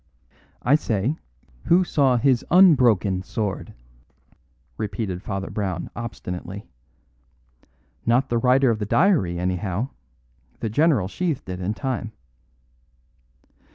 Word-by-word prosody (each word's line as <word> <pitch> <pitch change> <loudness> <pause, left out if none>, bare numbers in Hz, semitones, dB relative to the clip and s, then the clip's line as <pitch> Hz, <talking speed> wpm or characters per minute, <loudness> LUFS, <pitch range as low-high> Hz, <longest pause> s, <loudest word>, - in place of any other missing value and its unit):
"I 125 - +3
say, 120 -2 +1 0.5
who 180 +2 +5
saw 140 -7 +2
his 130 -1 +2
unbroken 125 - +5
sword?" 105 0 -4 1.0
repeated 100 -4 -4
Father 95 -2 -4
Brown 95 -4 -3
obstinately. 100 -4 -6 1.4
"Not 125 +4 +2
the 120 - +1
writer 130 +1 +4
of 110 - -2
the 105 - -2
diary, 145 - +2
anyhow; 90 +6 -2 0.7
the 110 - -3
general 140 - +3
sheathed 160 - -3
it 90 0 -4
in 100 +4 -2
time." 125 -5 -3
115 Hz, 105 wpm, -23 LUFS, 95-135 Hz, 1.4 s, who